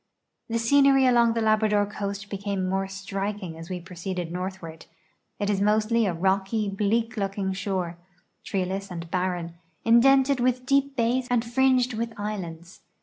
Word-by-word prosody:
The 230 - 0
scenery 270 +3 +4
along 235 -2 +4
the 230 - -1
Labrador 215 -1 +3
coast 200 -1 -5
became 200 -1 -2
more 195 +1 -1
striking 195 -2 -4
as 165 +2 -10
we 180 -1 -3
proceeded 175 0 -5
northward. 180 -3 -6 0.5
It 205 - -2
is 200 -1 0
mostly 215 +2 +2
a 180 - 0
rocky, 195 +4 0
bleak 220 +4 0
looking 195 -1 -2
shore, 185 -3 -3 0.4
treeless 195 +1 -3
and 170 -2 -7
barren, 175 -2 -2 0.3
indented 265 +3 +5
with 250 0 +1
deep 275 +1 +2
bays 245 +1 +1
and 245 -1 +1
fringed 255 +1 +2
with 230 +1 -3
islands. 180 -4 -6
205 Hz, 145 wpm, -26 LUFS, 185-230 Hz, 0.5 s, indented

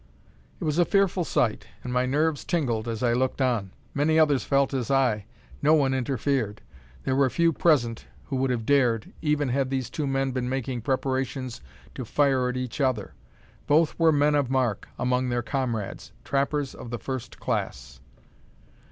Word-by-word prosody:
It - - -6
was 155 +1 0
a - - +7
fearful 195 -1 +2
sight, 115 -8 0 0.2
and 125 - -4
my 125 0 +2
nerves 150 +2 +1
tingled 120 -9 -1
as 115 0 -3
I 120 -1 +3
looked 130 +3 0
on. 120 -7 +1 0.2
Many 155 +3 +2
others 150 -4 +4
felt 140 0 +2
as 130 -2 -2
I. 125 -7 +2 0.4
No 155 +2 +5
one 135 -3 +2
interfered. 130 -4 -1 0.4
There 130 - 0
were 135 -1 +3
few 170 +4 +2
present 125 -9 +2 0.2
who 135 - -3
would 130 0 +1
have 120 -3 -1
dared, 120 -5 +2
even 150 -3 +1
had 135 +1 0
these 130 -2 -2
two 150 -3 -2
men 135 0 0
been 125 -1 -2
making 130 -2 -2
preparations 130 0 -2 0.3
to 130 - -5
fire 130 0 +2
at 125 - -3
each 125 +2 -4
other. 125 -7 0 0.5
Both 155 +2 +4
were 165 -1 +5
"men 150 0 +3
of 145 -4 +1
mark" 130 -6 0
among 125 0 0
their 120 0 -1
comrades: 120 -6 -3
trappers 140 0 0
of 120 - -9
the 120 - -3
first 130 0 -6
class. 65 0 -3
130 Hz, 175 wpm, -26 LUFS, 120-145 Hz, 0.5 s, a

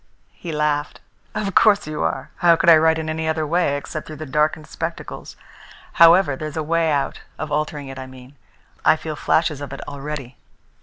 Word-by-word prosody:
He 170 - -7
laughed. 150 -1 -1 0.4
"Of 205 -3 -2
course 205 +1 +4
you 155 0 -4
are! 135 - -2
How 170 -1 +5
could 170 +1 +5
I - - +10
write 160 +1 +3
in 160 -1 -4
any 160 0 -2
other 160 0 0
way 160 -2 +1
except 155 +2 -7
through 155 - -8
the 155 +1 -7
darkened 150 +2 0
spectacles? 165 +1 -6 0.6
However, 165 -3 +6
there's 155 +2 -6
a 160 - -1
way 165 +1 +1
out 140 -2 -1 0.2
of 155 -1 -5
altering 150 -1 -2
it, 135 0 -8
I 130 - -7
mean. 130 +1 -14 0.5
I 155 - +5
feel 155 -1 -6
flashes 155 -1 +1
of 145 - -6
it 135 - -8
already. 140 -3 -6
155 Hz, 195 wpm, -21 LUFS, 145-160 Hz, 0.6 s, I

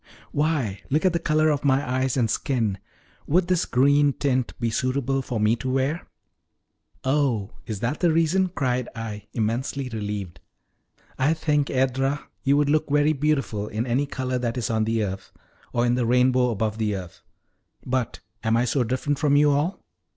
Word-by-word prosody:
"Why, 140 -10 0
look 155 +6 +1
at 185 - +4
the 170 - +1
color 155 -1 +2
of 145 - -1
my 140 -1 +2
eyes 130 +1 0
and 120 -3 +3
skin 110 -3 -1 0.5
would 175 +4 +2
this 180 -2 +2
green 140 +2 +3
tint 130 -3 -1
be 115 -2 0
suitable 135 +3 0
for 125 -3 -3
me 105 +2 +3
to 130 - -4
wear?" 135 +5 -1 1.0
"Oh, 130 -7 +1 0.2
is 105 -3 -4
that 125 +6 -1
the 175 -2 +3
reason!" 165 +4 +2
cried 125 -7 -1
I, 110 -2 -6
immensely 125 +4 -2
relieved. 105 -6 -5 0.8
"I 145 +5 +3
think, 150 -3 +1
Edra, 135 +2 0 0.2
you 140 +1 +3
would 145 -1 +3
look 155 0 +1
very 150 +2 +3
beautiful 135 -8 0
in 110 +3 -2
any 130 +4 0
color 130 -2 -2
that 120 0 -2
is 120 - -1
on 110 -1 +1
the 110 0 0
earth, 95 -1 -5 0.4
or 120 0 +1
in 120 - +2
the 125 -1 +1
rainbow 125 +1 +3
above 110 -1 -2
the 105 -2 0
earth. 90 -3 -8 0.6
But 130 -2 -2 0.2
am 115 0 +2
I 120 - +2
so 125 +1 +1
different 130 +4 -1
from 145 -3 +3
you 145 0 +5
all?" 150 +7 -1
130 Hz, 180 wpm, -24 LUFS, 115-145 Hz, 1.0 s, you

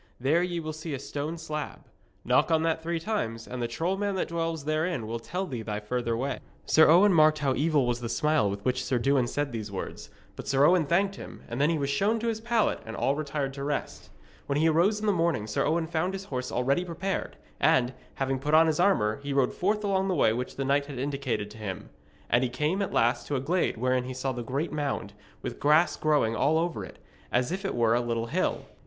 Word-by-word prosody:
There 145 +7 +2
ye 175 -1 -1
will 155 -1 -4
see 155 -1 -5
a - - -4
stone 145 +4 -4
slab. 150 -2 -6 0.4
Knock - - +3
on 160 -1 +3
that 165 0 0
three 170 +1 -2
times, 115 - -3
and 125 -1 -5
the 120 - 0
troll 165 +11 -1
man 200 -1 -1
that 185 - -1
dwells 165 -3 -2
therein 155 -4 -1
will 115 +2 -4
tell 180 +11 -3
thee 125 -9 -5
thy 105 -1 -3
further 115 +1 -2
way.' 135 +2 -2 0.3
Sir 160 0 +6
Owen 185 +5 +6
marked 155 -1 +5
how 140 -3 +1
evil 145 0 +2
was 120 0 0
the 120 -1 -4
smile 150 -3 +2
with 100 0 -5
which 130 0 0
Sir 130 - 0
Dewin 130 0 +2
said 145 +2 -2
these 110 -3 -5
words; 95 - -6 0.3
but - - -8
Sir 135 +1 +4
Owen 175 -2 +4
thanked 195 +5 +1
him, - - -10
and 120 +3 -3
then 150 - +4
he 165 - +1
was 140 -1 -1
shown 200 +11 +2
to 230 +1 -1
his 220 -1 -3
pallet 230 -1 +1
and 115 - -7
all 135 - +1
retired 145 -2 -3
to 140 0 -6
rest. 145 0 -4 0.4
When 140 - 0
he 160 +2 +3
arose 175 +7 +3
in 215 - -4
the 210 - +4
morning 170 - +1
Sir 105 - 0
Owen 165 +1 +1
found 170 +3 -1
his 195 0 -5
horse 125 -7 -4
already 135 +8 +1
prepared, 180 +2 -3 0.2
and, 125 0 +3 0.2
having 135 -1 -1
put 150 +3 +1
on 160 +1 +7
his 160 -1 0
armour, 120 - +2
he 140 0 -3
rode 135 -2 +2
forth 210 +3 0
along 195 -1 +1
the 185 - 0
way 110 - +3
which 125 +2 -4
the 135 - -2
knight 140 +1 +1
had 140 -3 -7
indicated 130 -6 -2
to 110 - -12
him. 100 -3 -6 0.4
And 120 - +3
he 125 - 0
came 150 +10 -1
at 195 - -2
last 115 +1 +1
to 145 - -1
the - - +1
glade 165 +1 0
wherein 125 +1 +1
he 130 0 -6
saw 130 +1 -2
the 125 -1 -4
great 135 +7 -2
mound, 140 -9 -3 0.3
with - - -5
grass 155 +4 +4
growing 145 -8 +2
all 150 +6 +2
over 170 +1 -1
it, - - -10 0.3
as 125 +4 +1
if 190 +2 -3
it 195 - -2
were 115 -1 +3
a 120 - +2
little 115 -1 -1
hill. 115 - -1
145 Hz, 245 wpm, -28 LUFS, 125-170 Hz, 0.4 s, on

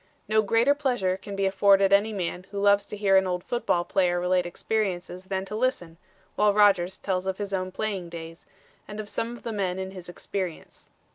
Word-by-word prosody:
No 215 +1 +3
greater 230 +6 +3
pleasure 245 -10 0
can 195 +1 -8
be 195 0 0
afforded 195 0 +4
any 205 +2 +4
man 185 -2 -4
who 200 - -5
loves 200 0 +3
to 210 - -7
hear 195 -2 +4
an 190 0 +3
old 180 -1 -2
football 210 -7 0
player 175 -1 +1
relate 180 0 +1
experiences 185 -1 -3
than 190 0 -3
to 210 - -6
listen, 215 -9 -1 0.4
while 210 -1 +3
Rodgers 190 -3 +4
tells 190 -1 -2
of 190 0 -1
his 200 -1 -5
own 185 -1 -2
playing 195 -4 -3
days, 165 0 -9 0.4
and 210 0 -7
of 215 - -5
some 235 +3 -3
of - - -18
the 230 -2 -4
men 190 -3 -1
in 190 0 -4
his 185 -2 -9
experience. 180 -1 -6
195 Hz, 205 wpm, -26 LUFS, 180-210 Hz, 0.4 s, afforded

